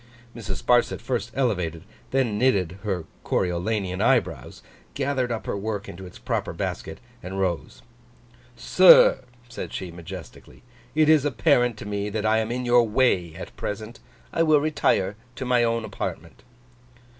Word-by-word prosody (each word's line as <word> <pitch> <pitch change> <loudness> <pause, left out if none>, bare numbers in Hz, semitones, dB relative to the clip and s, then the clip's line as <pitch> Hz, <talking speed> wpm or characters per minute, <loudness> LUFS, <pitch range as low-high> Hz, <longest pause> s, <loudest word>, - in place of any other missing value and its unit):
Mrs. 100 -5 -6
Sparsit 120 0 +3
first 120 -2 -3
elevated, 90 - -1 0.3
then 125 -6 0
knitted, 95 -8 +1
her 95 -5 -3 0.2
Coriolanian 95 +1 -1
eyebrows; 110 - 0 0.3
gathered 130 -3 -1
up 115 - -4
her - - -2
work 105 +1 -4
into 95 +2 -9
its 90 - -13
proper - - -3
basket; - - -5 0.2
and 95 +2 -6
rose. 90 -3 -3 0.7
'Sir,' 155 0 +6 0.2
said 120 - -7
she, 95 -2 -5
majestically. 85 +2 -11 0.3
'It 155 -1 +4
is 155 -3 +5
apparent 125 -5 +2
to - - -8
me 105 0 -3
that 110 +1 -3
I 110 +1 +3
am 110 +1 -2
in 125 +1 -3
your 120 0 +5
way 105 -8 +1
at - - -9
present. 110 +3 -6 0.3
I - - +1
will 155 -2 +5
retire 110 -9 +1 0.2
to 130 - -5
my 125 -1 +3
own 115 -1 0
apartment. 100 - -6
110 Hz, 150 wpm, -24 LUFS, 95-125 Hz, 0.7 s, Sir